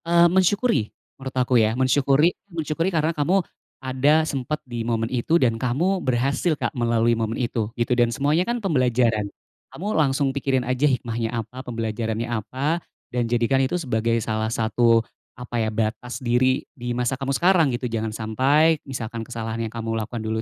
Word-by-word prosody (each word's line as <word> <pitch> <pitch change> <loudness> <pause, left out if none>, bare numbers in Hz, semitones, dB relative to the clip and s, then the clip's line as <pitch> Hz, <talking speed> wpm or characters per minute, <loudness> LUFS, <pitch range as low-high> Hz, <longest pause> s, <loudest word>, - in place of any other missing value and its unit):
Eee, 170 0 +5
mensyukuri, 190 - +2 0.3
menurut 135 0 -6
aku 125 0 +1
ya. 110 +2 +1
Mensyukuri 140 +5 +3 0.2
mensyukuri 165 0 -1
karena 165 -2 0
kamu 170 +5 +1 0.4
ada 140 +4 +2
sempet 145 +1 -2
di 120 -2 -5
momen 115 -1 -1
itu 130 +7 +1
dan 115 -3 +2
kamu 170 +10 0
berhasil 135 +6 +1
Kak - - -2
melalui 120 -2 +2
momen 115 0 -2
itu 115 -3 -1
gitu, 120 +1 +1
dan 120 -1 +4
semuanya 150 +8 +1
kan 240 +3 -1
pembelajaran. 125 - +2 0.5
Kamu 205 +5 -3
langsung 135 -2 +2
pikirin 135 -2 +1
aja 130 +3 +1
hikmahnya 115 -3 -2
apa, 130 +4 -9
pembelajarannya 115 0 -3
apa 130 +9 -2 0.3
dan 120 -1 0
jadikan 120 +3 +2
itu 135 +7 0
sebagai 115 -4 0
salah 110 0 -1
satu, 115 0 +3 0.4
apa 125 0 -7
ya, - - 0
batas 115 +3 -2
diri 130 +1 +2 0.2
di 120 -1 -3
masa 125 +1 0
kamu 135 +1 -2
sekarang 175 -3 +4
gitu. 120 +1 -3
Jangan 110 -1 -3
sampai 135 +9 +2
misalkan 115 -3 -5
kesalahan 115 -1 -4
yang - - -18
kamu 115 -1 -3
lakukan 110 +1 -4
dulu 110 0 -2
125 Hz, 170 wpm, -23 LUFS, 115-145 Hz, 0.5 s, Eee